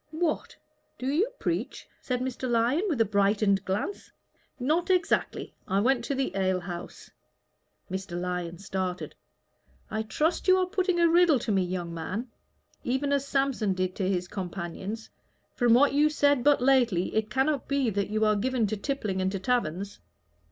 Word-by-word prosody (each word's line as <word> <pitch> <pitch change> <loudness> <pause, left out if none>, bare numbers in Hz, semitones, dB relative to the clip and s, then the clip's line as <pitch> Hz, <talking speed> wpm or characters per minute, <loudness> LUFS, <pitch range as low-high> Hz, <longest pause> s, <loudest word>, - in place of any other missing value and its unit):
"What! 315 0 -2 0.4
do 255 - -6
you 315 - +2
preach?" - - -3
said 250 -1 -2
Mr. 255 0 -3
Lyon, 240 +7 +2
with 225 - +1
brightened 200 -1 +2
glance. 205 - -3 0.5
"Not 315 +8 +1
exactly. 365 -2 0
I 195 - +1
went 245 +2 +2
to 280 - -1
the 265 -6 -2
ale 190 -1 +1
house." 175 -1 -8 0.8
Mr. 190 -2 -4
Lyon 180 -1 -3
started. 185 -1 -4 0.8
"I 215 - -1
trust 305 - -1
you 370 0 +6
are 370 - +2
putting 370 -2 0
a 340 - +5
riddle 335 -3 +5
to 225 - -3
me, 195 -2 +3
young 175 -2 -3
man, 190 +9 -4 0.5
even 275 +3 0
as 280 0 0
Samson 270 -8 +1
did 185 0 -1
to 190 -2 0
his 180 -2 -1
companions. 190 +3 -5 0.4
From 240 -2 +4
what 280 +3 +5
you 295 +2 +4
said 285 -4 +2
but 290 -3 +4
lately, 245 -9 +3
it 220 0 0
cannot 270 +4 0
be 275 -4 +1
that 200 0 -1
you 215 +1 +1
are 215 0 +3
given 245 +2 0
to 210 +1 -2
tippling 205 -5 -2
and 190 0 0
to 195 - -2
taverns." 200 -2 -1
225 Hz, 165 wpm, -28 LUFS, 190-280 Hz, 0.8 s, you